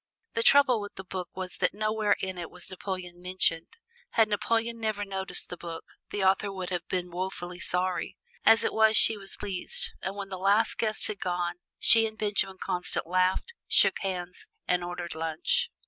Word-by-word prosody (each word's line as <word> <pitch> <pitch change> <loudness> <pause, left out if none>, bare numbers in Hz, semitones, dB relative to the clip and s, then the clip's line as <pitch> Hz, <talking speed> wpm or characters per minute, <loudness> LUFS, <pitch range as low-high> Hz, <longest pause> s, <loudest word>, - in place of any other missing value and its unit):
The 230 - 0
trouble 255 -3 +5
with 205 - -8
the 190 - -7
book 185 -2 -5
was 185 -1 -4
that - - +1
nowhere 215 0 +1
in 190 -1 -4
it 170 - -5
was 180 +1 -6
Napoleon 185 -2 -6
mentioned. 180 -2 0 0.4
Had 220 -1 +4
Napoleon 230 +2 0
never 215 -2 -2
noticed 190 -1 -2
the 180 - -6
book, 165 -1 -8 0.2
the 205 - -2
author 195 +1 +2
would 185 -2 -5
have 175 0 -3
been 180 -1 -2
woefully 180 0 -5
sorry. 180 0 0 0.3
As 225 - +6
it - - 0
was 220 0 +4
she 225 - +7
was 195 -1 -1
pleased, 195 -3 -4
and 190 - -4
when 200 -1 -6
the 190 -1 -5
last 200 +4 +2
guest 215 -1 +1
had 210 -2 -2
gone 175 -1 -2 0.2
she 225 0 +6
and 220 0 -9
Benjamin 200 -3 0
Constant 180 -1 -2
laughed, 185 - +1
shook - - +5
hands, 180 -2 -5 0.2
and 180 -1 +1
ordered 175 -1 -5
lunch. 160 0 0
190 Hz, 185 wpm, -28 LUFS, 180-210 Hz, 0.4 s, she